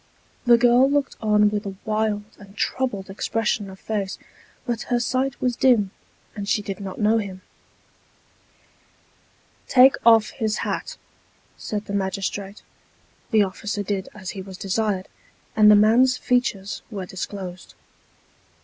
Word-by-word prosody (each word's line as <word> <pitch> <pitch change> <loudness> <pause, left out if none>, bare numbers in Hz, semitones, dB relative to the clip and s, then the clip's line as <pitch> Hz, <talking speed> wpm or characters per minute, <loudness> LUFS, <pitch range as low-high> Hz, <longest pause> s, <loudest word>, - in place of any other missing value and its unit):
The 240 -1 +7
girl 245 +2 +5
looked 285 -1 0
on 210 -1 +3
with 210 0 -2
a 195 - -6
wild 215 -1 0 0.2
and 200 0 -15
troubled 230 -7 -2
expression 210 +1 -2
of 190 0 -12
face; 200 -3 -3 0.5
but 235 -2 -2
her 245 -1 +2
sight 255 +2 -1
was 250 -1 0
dim, 230 -7 +3 0.4
and 200 -1 -5
she 210 - +1
did 195 -1 -5
not 195 -2 -7
know 220 +1 +3
him. 190 -3 -6 1.6
" - - -36
Take 260 +2 +8
off 225 -2 +5
his 220 -1 -2
hat," - - -4 0.6
said 210 -1 -5
the 200 - -6
magistrate. 195 +1 -3 0.7
The 215 -3 +4
officer 205 +2 -4
did 195 -1 -3
as 190 -3 -6
he 195 - -7
was 190 -1 -10
desired, 195 -1 -1 0.5
and 215 -1 +7
the 210 - +8
man's 235 +5 +5
features 210 -6 -1
were 200 -4 -5
disclosed. 185 -1 -7
210 Hz, 140 wpm, -23 LUFS, 195-230 Hz, 1.6 s, Take